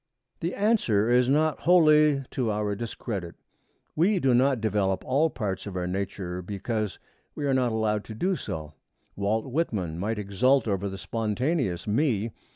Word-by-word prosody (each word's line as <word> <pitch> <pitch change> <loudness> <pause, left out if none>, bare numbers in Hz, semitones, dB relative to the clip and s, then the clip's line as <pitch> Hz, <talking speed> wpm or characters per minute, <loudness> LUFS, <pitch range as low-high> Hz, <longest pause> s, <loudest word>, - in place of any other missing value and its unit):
The 170 +2 -2
answer 120 - +2
is 125 +1 +4
not 155 +2 +2
wholly 155 -5 +5
to 125 -4 -1
our 105 -1 -1
discredit. 100 -4 -5 0.6
We 185 +5 +3
do 135 -6 +3
not 130 +1 +3
develop 100 -3 0
all 145 +5 +2
parts 105 -8 -4
of 100 - -6
our 90 -1 -2
nature 90 -1 -3
because 105 +3 -3 0.4
we 145 - -3
are 140 - +2
not 125 -2 +2
allowed 110 -1 0
to 110 - -8
do 185 - 0
so. 80 - -6 0.4
Walt 105 +3 0
Whitman 110 - -2
might 105 +4 -2
exult 110 +6 +2
over 100 -1 -1
the 95 - -6
Spontaneous 115 - -1
Me. 115 -1 +1
110 Hz, 160 wpm, -27 LUFS, 100-140 Hz, 0.6 s, wholly